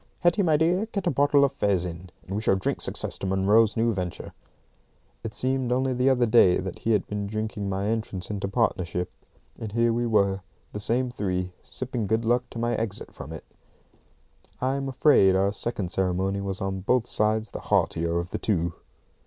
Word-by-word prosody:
"Hetty, 175 +3 +3
my 160 -5 +3
dear, 175 +7 +2
get 200 -4 -4
a 175 - +2
bottle 140 +1 +4
of 135 - -1
fez 100 -9 +1
in, 90 +1 -7 0.2
and 95 - -5
we 105 - -1
shall 105 - +3
drink 95 - -2
success - - -2
to 95 - -3
Munro's 100 +4 +3
new 115 0 +2
venture." 90 -3 -5 0.9
It 115 - -6
seemed 130 -1 0
only 130 +1 +1
the 125 +2 +2
other 125 -2 +3
day 110 -6 +5
that 95 -1 -5
he 115 - +1
had 105 - +1
been 105 -1 -4
drinking 110 -1 -3
my 95 +1 -2
entrance 110 -3 -3
into 100 -1 -2
partnership; 90 -2 -1 0.5
and 110 -2 -6
here 115 0 +2
we 120 +1 0
were, 100 -3 +2 0.3
the 105 - -4
same 120 +4 0
three, 90 -5 -2
sipping 125 -4 -3
good 110 +2 0
luck 120 +2 +1
to - - -9
my 120 +1 0
exit 110 -3 -4
from 75 - -9
it! 80 - -8 1.2
I'm 135 +1 -1
afraid 125 -8 +5
our 100 +1 +2
second 100 -3 -3
ceremony 95 +1 0
was 95 -1 -2
on 95 0 -2
both 120 +5 +1
sides 110 -2 0
the - - -6
heartier 85 +1 +1
of 85 +1 -3
the - - -3
two. 85 -5 0
105 Hz, 195 wpm, -26 LUFS, 95-125 Hz, 1.2 s, day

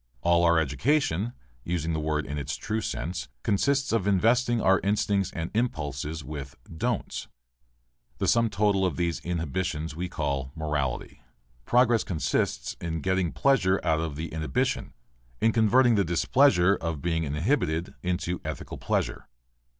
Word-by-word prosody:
All 85 0 +3
our 85 -1 +5
education, 105 - +1 0.3
using 85 0 -2
the 80 - -1
word 75 -1 -1
in 75 +1 -4
its 70 +1 -3
true 110 +6 -3
sense, 85 -3 -4 0.2
consists 135 +6 +1
in 100 -4 +1
investing 115 +5 +3
our 95 -2 +4
instincts 100 -1 +1
and 85 0 -4
impulses 80 - -2
with 70 -1 -7 0.2
don'ts. 80 - -2 0.9
The - - -1
sum 115 -1 +3
total 100 -2 +2
of 90 -7 0
these 85 -2 0
inhibitions 85 -2 -3
we 90 +2 -3
call 70 -6 -2
morality. 75 -5 -3 0.4
Progress 120 -2 +4
consists 85 -4 -1
in 80 -2 -3
getting 95 -1 0
pleasure 100 -9 +3
out 80 - +2
of 80 -3 -3
the 80 +1 -5
inhibition, 75 -4 -1 0.4
in 115 - +3
converting 120 +3 +4
the 100 -2 +3
displeasure 90 +3 +4
of 80 -3 -4
being 80 -1 0
inhibited 80 - 0
into 90 0 -2
ethical - - -6
pleasure. - - -2
85 Hz, 140 wpm, -27 LUFS, 80-105 Hz, 0.9 s, our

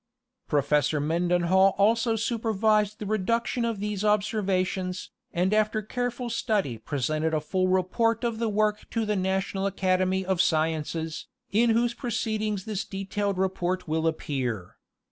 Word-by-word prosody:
Professor 150 +1 +2
Mendenhall 175 +4 +3
also 225 +3 +3
supervised 215 -2 +1
the 215 - -6
reduction 230 +4 0
of 230 -3 -2
these 210 -1 -3
ob 210 -1 +3
servations, 185 -3 -1 0.2
and 185 +4 +1
after 215 0 +1
careful 245 +2 -3
study 205 - -1
presented 155 +6 -1
a - - +2
full 185 +5 0
report 190 +6 +1
of 230 -2 -1
the 230 -1 0
work 210 0 0
to 230 -1 -1
the 210 0 0
National 190 +1 0
Academy 185 -1 +1
of 185 -2 +2
Sciences, 160 0 -1 0.2
in 230 +3 +3
whose 235 +1 +2
proceedings 215 -4 -2
this 210 -3 -2
detailed 195 0 -3
report 185 -1 -1
will 160 +1 0
appear. 125 - -3
195 Hz, 140 wpm, -27 LUFS, 175-215 Hz, 0.2 s, Mendenhall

